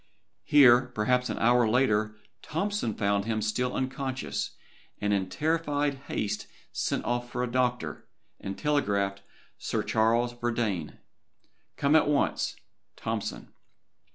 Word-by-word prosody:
Here, 130 Hz, -3 st, +7 dB
perhaps 125 Hz, +4 st, +1 dB
an -, -, -3 dB
hour 120 Hz, 0 st, +4 dB
later, 110 Hz, -3 st, +2 dB, 0.3 s
Tompson 165 Hz, -, -2 dB
found 100 Hz, 0 st, +1 dB
him 110 Hz, -1 st, -1 dB
still 125 Hz, +4 st, -1 dB
unconscious, 130 Hz, -, -3 dB, 0.4 s
and 105 Hz, 0 st, +1 dB
in 95 Hz, -2 st, 0 dB
terrified 145 Hz, -2 st, 0 dB
haste 105 Hz, 0 st, -2 dB, 0.2 s
sent -, -, -2 dB
off 120 Hz, 0 st, -1 dB
for 125 Hz, 0 st, -2 dB
a 125 Hz, -, -3 dB
doctor, 125 Hz, -1 st, -1 dB, 0.3 s
and 95 Hz, 0 st, -5 dB
telegraphed 100 Hz, -10 st, +1 dB
to -, -, -30 dB, 0.4 s
Sir -, -, -1 dB
Charles 115 Hz, +2 st, +2 dB
Verdayne: 115 Hz, -9 st, -2 dB, 0.8 s
"Come 140 Hz, +2 st, +3 dB
at 160 Hz, -, +5 dB
once, 145 Hz, -1 st, +1 dB, 0.4 s
TOMPSON." -, -, -4 dB
120 Hz, 125 wpm, -28 LUFS, 105-135 Hz, 0.8 s, Here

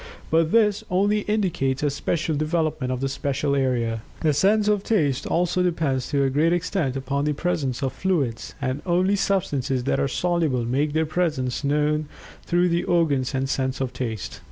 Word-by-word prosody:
But 160 Hz, 0 st, +3 dB
this 215 Hz, -2 st, +3 dB
only 205 Hz, +3 st, +2 dB
indicates 175 Hz, -11 st, 0 dB
a 145 Hz, -, +2 dB
special 155 Hz, +2 st, -1 dB
development 155 Hz, -3 st, -1 dB
of 125 Hz, 0 st, -3 dB
the 135 Hz, -, 0 dB
special 140 Hz, +1 st, -1 dB
area. 120 Hz, -4 st, 0 dB, 0.2 s
The 155 Hz, -2 st, +2 dB
sense 205 Hz, +8 st, +3 dB
of 210 Hz, -2 st, +2 dB
Taste 150 Hz, -, +1 dB
also 175 Hz, +1 st, +1 dB
depends 155 Hz, -8 st, 0 dB
to 140 Hz, -2 st, +1 dB
a 135 Hz, -, +2 dB
great 155 Hz, +5 st, +2 dB
extent 175 Hz, -6 st, -1 dB
upon 140 Hz, +2 st, -2 dB
the 150 Hz, -, +1 dB
presence 140 Hz, -6 st, -2 dB
of 130 Hz, -, -1 dB
fluids, 145 Hz, -12 st, -1 dB
and 135 Hz, +1 st, -2 dB
only 185 Hz, +3 st, +2 dB
substances 150 Hz, -11 st, 0 dB
that 135 Hz, -, 0 dB
are -, -, +1 dB
soluble 160 Hz, -6 st, 0 dB
make 140 Hz, +5 st, 0 dB
their 160 Hz, +1 st, +2 dB
presence 150 Hz, -6 st, -1 dB
known 150 Hz, +1 st, +1 dB, 0.4 s
through 175 Hz, +1 st, +3 dB
the 170 Hz, +1 st, +1 dB
organs 145 Hz, -7 st, +1 dB
and 135 Hz, +1 st, 0 dB
sense 130 Hz, -1 st, -1 dB
of 130 Hz, -2 st, -2 dB
Taste. 115 Hz, -6 st, -5 dB
150 Hz, 180 wpm, -24 LUFS, 135-175 Hz, 0.4 s, But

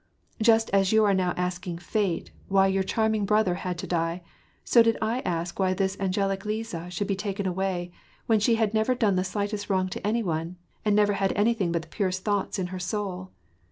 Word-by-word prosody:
Just 225 Hz, 0 st, +4 dB
as 195 Hz, -1 st, +3 dB
you 220 Hz, 0 st, +5 dB
are 200 Hz, -, +3 dB
now 185 Hz, -2 st, +1 dB
asking 180 Hz, -1 st, -3 dB
Fate 175 Hz, +1 st, -2 dB, 0.2 s
why 195 Hz, 0 st, +4 dB
your 195 Hz, 0 st, +2 dB
charming 220 Hz, +2 st, 0 dB
brother 210 Hz, -2 st, +2 dB
had 180 Hz, 0 st, -4 dB
to -, -, -5 dB
die, 170 Hz, 0 st, -1 dB, 0.4 s
so 235 Hz, -, +5 dB
did 230 Hz, 0 st, +3 dB
I 225 Hz, +3 st, 0 dB
ask 170 Hz, -5 st, -3 dB
why 185 Hz, -1 st, +2 dB
this 190 Hz, +1 st, 0 dB
angelic 195 Hz, 0 st, 0 dB
Liza 210 Hz, -5 st, -4 dB
should 180 Hz, +3 st, -3 dB
betaken 200 Hz, 0 st, -2 dB
away, 180 Hz, -1 st, -2 dB, 0.3 s
when 225 Hz, -2 st, +3 dB
she 230 Hz, +3 st, +3 dB
had 220 Hz, -2 st, 0 dB
never 220 Hz, +3 st, +2 dB
done 215 Hz, -5 st, +2 dB
the 185 Hz, -, +2 dB
slishtest 205 Hz, +2 st, -3 dB
wrong 185 Hz, -1 st, +1 dB
to 190 Hz, -, -4 dB
any 230 Hz, +2 st, +1 dB
one, 165 Hz, -1 st, -2 dB, 0.3 s
and 210 Hz, -1 st, +2 dB
never 205 Hz, -1 st, +4 dB
had 195 Hz, -1 st, 0 dB
any 220 Hz, +3 st, +3 dB
thing 190 Hz, -7 st, -1 dB
but 170 Hz, -1 st, -1 dB
the -, -, -15 dB
purest 185 Hz, -3 st, -2 dB
thoughts 205 Hz, -1 st, 0 dB
in 190 Hz, -, -1 dB
her 185 Hz, -, -4 dB
soul. 185 Hz, 0 st, -3 dB
195 Hz, 210 wpm, -26 LUFS, 180-215 Hz, 0.4 s, you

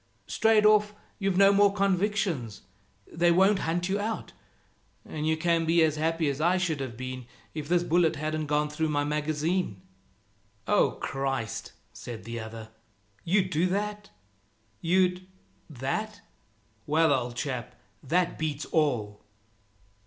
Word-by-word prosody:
Straight 220 Hz, -1 st, +3 dB
off, 210 Hz, 0 st, +4 dB, 0.2 s
you've 195 Hz, -2 st, 0 dB
no 195 Hz, +1 st, +6 dB
more 200 Hz, 0 st, +5 dB
convictions. 195 Hz, -, 0 dB, 0.4 s
They 170 Hz, +1 st, +2 dB
won't 190 Hz, +3 st, +4 dB
hunt 175 Hz, +1 st, 0 dB
you 195 Hz, +2 st, 0 dB
out, 220 Hz, +2 st, -4 dB, 0.7 s
and 155 Hz, 0 st, -4 dB
you 160 Hz, 0 st, +2 dB
can 165 Hz, 0 st, +1 dB
be 165 Hz, +1 st, +4 dB
as 155 Hz, -1 st, +2 dB
happy 160 Hz, 0 st, 0 dB
as 140 Hz, +1 st, -2 dB
I 175 Hz, +3 st, +3 dB
should 170 Hz, -5 st, -1 dB
have 130 Hz, -4 st, -5 dB
been 130 Hz, -1 st, -6 dB, 0.3 s
if 155 Hz, -1 st, -6 dB
this 175 Hz, 0 st, +3 dB
bullet 170 Hz, -1 st, +2 dB
hadn't 155 Hz, +1 st, -3 dB
gone 150 Hz, 0 st, +1 dB
through 155 Hz, +1 st, -1 dB
my 145 Hz, -1 st, +1 dB
magazine." 150 Hz, -, -1 dB, 0.9 s
"Oh -, -, +3 dB
Christ!" 135 Hz, -4 st, -3 dB, 0.2 s
said 120 Hz, -3 st, -8 dB
the 115 Hz, 0 st, -5 dB
other, 110 Hz, 0 st, -8 dB, 0.5 s
"you'd 185 Hz, +1 st, +1 dB
do 170 Hz, +3 st, +2 dB
that? 210 Hz, +2 st, -3 dB, 0.7 s
You'd 180 Hz, +1 st, +1 dB, 0.4 s
that 190 Hz, -, -4 dB, 0.7 s
well, 160 Hz, 0 st, +4 dB
old 125 Hz, -2 st, -2 dB
chap, 125 Hz, -2 st, -4 dB, 0.3 s
that 175 Hz, +5 st, 0 dB
beats 155 Hz, -2 st, -2 dB
all!" 115 Hz, -10 st, 0 dB
160 Hz, 140 wpm, -28 LUFS, 140-185 Hz, 0.9 s, no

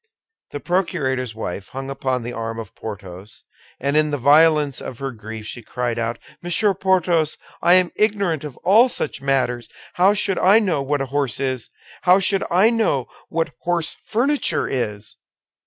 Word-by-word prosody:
The 145 Hz, -, -6 dB
procurator's 135 Hz, -, -1 dB
wife 100 Hz, -2 st, -5 dB
hung 135 Hz, +1 st, -6 dB
upon 130 Hz, -2 st, -2 dB
the 120 Hz, +1 st, -5 dB
arm 115 Hz, -1 st, -4 dB
of 110 Hz, -4 st, -8 dB
Porthos, 100 Hz, -2 st, -9 dB, 0.4 s
and 140 Hz, +2 st, -1 dB
in 155 Hz, 0 st, +3 dB
the 145 Hz, -, -1 dB
violence 150 Hz, +1 st, +4 dB
of 125 Hz, -, -7 dB
her 135 Hz, 0 st, -4 dB
grief 110 Hz, -1 st, -9 dB
she 120 Hz, -, -6 dB
cried 120 Hz, 0 st, -3 dB
out, 115 Hz, 0 st, -2 dB, 0.2 s
"Monsieur 190 Hz, +4 st, +2 dB
Porthos, 180 Hz, -5 st, +1 dB, 0.2 s
I 175 Hz, -, +5 dB
am 185 Hz, -1 st, +3 dB
ignorant 200 Hz, -8 st, +1 dB
of 145 Hz, -4 st, -8 dB
all 220 Hz, +8 st, +6 dB
such 145 Hz, -, -3 dB
matters! 130 Hz, -3 st, 0 dB, 0.2 s
How 190 Hz, +3 st, +4 dB
should 195 Hz, -2 st, +1 dB
I 195 Hz, +4 st, +6 dB
know 185 Hz, -10 st, +1 dB
what 140 Hz, +1 st, -1 dB
a -, -, -1 dB
horse 140 Hz, -6 st, 0 dB
is? 130 Hz, -3 st, -2 dB, 0.3 s
How 180 Hz, +2 st, +5 dB
should 195 Hz, 0 st, +2 dB
I 190 Hz, +6 st, +4 dB
know 215 Hz, -, 0 dB, 0.2 s
what 165 Hz, -2 st, -1 dB
horse 170 Hz, -2 st, 0 dB
furniture 275 Hz, +6 st, 0 dB
is?" 105 Hz, -5 st, -4 dB
145 Hz, 170 wpm, -21 LUFS, 120-180 Hz, 0.4 s, all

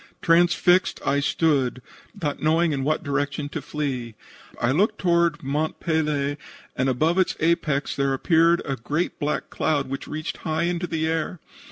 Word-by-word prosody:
Transfixed 175 Hz, +2 st, +3 dB
I 140 Hz, -, +2 dB
stood, 140 Hz, -4 st, +1 dB, 0.4 s
not 150 Hz, -6 st, -2 dB
knowing 160 Hz, +2 st, +3 dB
in 135 Hz, -2 st, -1 dB
what 155 Hz, +3 st, 0 dB
direction 145 Hz, 0 st, -2 dB
to 155 Hz, -, -5 dB
flee. 135 Hz, -6 st, -4 dB, 0.4 s
I 120 Hz, -, +2 dB
looked 190 Hz, +10 st, +2 dB
toward 170 Hz, -3 st, +1 dB
Mont 150 Hz, +4 st, -2 dB
Pelee, 150 Hz, -3 st, 0 dB, 0.4 s
and 130 Hz, 0 st, +1 dB
above 155 Hz, +8 st, +1 dB
its 185 Hz, -, +2 dB
apex 155 Hz, -3 st, 0 dB
there 140 Hz, -1 st, +1 dB
appeared 165 Hz, +3 st, +3 dB
a 135 Hz, -, -2 dB
great 150 Hz, +8 st, -2 dB
black 150 Hz, 0 st, -2 dB
cloud 145 Hz, -3 st, 0 dB
which 135 Hz, -, -5 dB
reached 155 Hz, +1 st, -4 dB
high 160 Hz, +1 st, -2 dB
in 175 Hz, 0 st, 0 dB
the 165 Hz, -3 st, -2 dB
air. 160 Hz, +2 st, -2 dB
155 Hz, 160 wpm, -24 LUFS, 140-170 Hz, 0.4 s, Transfixed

